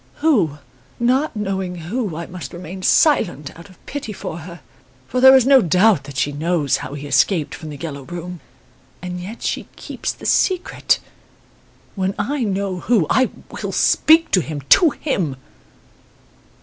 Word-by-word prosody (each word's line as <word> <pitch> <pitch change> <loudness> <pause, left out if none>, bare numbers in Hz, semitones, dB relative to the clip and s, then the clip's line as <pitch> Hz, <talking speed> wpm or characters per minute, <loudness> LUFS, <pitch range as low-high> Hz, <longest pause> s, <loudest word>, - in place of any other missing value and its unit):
Who? 210 - +1 0.4
Not 255 +4 +1
knowing 190 -3 -3
who, 180 +2 -4
I 170 +1 -5
must 175 -6 -9
remain 180 +2 -8
silent, 175 - +2
out 170 +4 -13
of 185 - -18
pity 285 -6 -6
for 170 -4 -6
her. 170 0 -10 0.5
For 250 - -1
there 265 +1 +9
is 260 -3 +5
no 270 -1 +6
doubt 185 -3 +3
that 140 -1 -9
she 145 - 0
knows 155 0 0
how 135 - -7
he 145 0 -7
escaped 145 +4 +1
from 160 - -8
"The 145 - -8
Yellow 140 -3 -6
Room", 175 +4 -7 0.6
and 180 0 -5
yet 205 +6 -8
she - - -2
keeps - - -5
the - - -12
secret. 370 -2 +1 1.0
When 190 -1 -2
I 255 +6 -1
know 195 -2 -2
who, 210 -3 +2
I 260 -1 +3 0.3
will - - -3
speak 325 +1 +4
to 185 - +4
him 155 -3 -6
to 340 - +7
him!" 190 - -2
185 Hz, 160 wpm, -20 LUFS, 160-235 Hz, 1.0 s, there